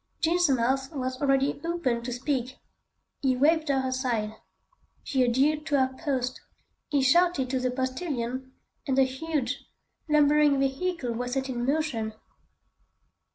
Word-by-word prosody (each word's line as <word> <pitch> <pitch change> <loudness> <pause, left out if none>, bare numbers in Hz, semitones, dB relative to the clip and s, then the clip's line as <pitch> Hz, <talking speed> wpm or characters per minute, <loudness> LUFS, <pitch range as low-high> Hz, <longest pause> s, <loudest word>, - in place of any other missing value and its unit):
Jean's 345 0 +3
mouth 265 +2 +1
was 255 -1 -3
already 275 0 +2
open 330 -9 -1
to 245 +1 -5
speak. 255 0 -2 0.6
He 265 -2 +2
waved 310 +3 +3
her 265 -1 +1
aside. 245 -5 -1 0.7
She 265 -2 +1
adhered 275 +5 +2
to 290 - +2
her 260 -1 +1
post. 260 -3 -2 0.5
He 285 -2 +2
shouted 280 -2 +3
to 260 - +1
the 255 0 0
postilion, 260 -1 -3 0.4
and 265 -1 +1
the 270 - +7
huge, 265 -1 -2 0.5
lumbering 295 -1 +4
vehicle 275 -1 -1
was 245 +1 -3
set 265 0 -1
in 240 -1 -2
motion. 270 -8 -1
265 Hz, 135 wpm, -27 LUFS, 255-295 Hz, 0.7 s, the